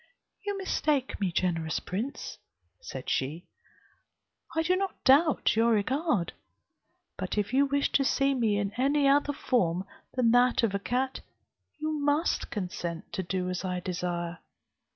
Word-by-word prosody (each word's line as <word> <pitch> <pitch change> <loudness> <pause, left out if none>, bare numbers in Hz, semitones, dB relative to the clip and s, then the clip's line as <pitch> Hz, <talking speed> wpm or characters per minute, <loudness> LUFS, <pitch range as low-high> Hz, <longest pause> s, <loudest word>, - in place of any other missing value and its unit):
"You 405 -1 -2
mistake 300 -8 0
me, 190 -3 +1
generous 165 -2 0
prince," 220 +10 -5 0.4
said - - -7
she, 150 +7 -1 1.1
"I 320 - +2
do 360 +3 +3
not 385 0 -3
doubt 285 -1 +4
your 230 +1 +4
regard; 240 - 0 0.9
but - - -3
if 210 +3 -1
you 280 +2 +4
wish 280 +1 +1
to 275 - +3
see 275 0 +2
me 225 -5 +1
in 200 -1 -1
any 280 +2 +3
other 285 +1 +4
form 190 -10 0 0.3
than 245 -3 +3
that 245 0 +4
of 215 -4 +2
a 200 - 0
cat, 255 +5 -1 0.6
you 310 +1 -2
must 290 +3 +1
consent 175 -4 -5
to - - -1
do 185 0 -2
as 180 0 -3
I 180 -1 -2
desire. 175 -1 -3
240 Hz, 150 wpm, -29 LUFS, 180-280 Hz, 1.1 s, doubt